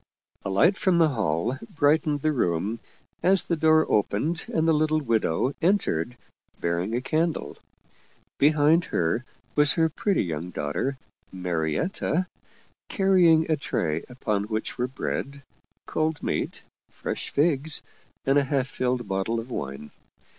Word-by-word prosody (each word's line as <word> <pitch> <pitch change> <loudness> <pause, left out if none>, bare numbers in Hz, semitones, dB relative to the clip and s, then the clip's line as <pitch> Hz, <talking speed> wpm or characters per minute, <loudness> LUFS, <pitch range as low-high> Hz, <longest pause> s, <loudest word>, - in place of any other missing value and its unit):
A - - -3
light 165 - +3
from 185 -3 +3
the 165 -2 +5
hall 110 - -1 0.2
bright 155 0 +4
ened 145 -2 -1
the 155 - +2
room 105 - 0 0.4
as 190 +1 +5
the 170 - -1
door 160 0 +4
opened 115 - 0
and 160 0 +1
the 165 - +5
little 155 0 +2
widow 115 - 0
en 190 +5 +4
tered, 85 - -3 0.4
bearing 85 +6 -1
a 125 - 0
candle. 160 +4 -1 0.8
Behind 155 +3 +4
her 85 +9 0 0.3
was 150 -1 +5
her 160 -1 +2
pretty 195 +5 0
young 85 -1 -4
daughter, 90 - -2 0.3
Marietta, 90 - -1 0.6
carrying 180 -5 +4
a 160 - +2
tray 80 - -2
upon 105 -5 -2
which 110 0 -3
were 125 0 -1
bread, 140 +2 -4 0.4
cold 155 -1 -1
meat, - - -2 0.3
fresh - - -5
figs, 150 0 +1 0.4
and 135 +1 +4
a 140 - 0
half 135 -1 0
filled 125 -2 -2
bottle 95 +4 -1
of 120 +3 -8
wine. 70 - -5
135 Hz, 140 wpm, -26 LUFS, 100-160 Hz, 0.8 s, the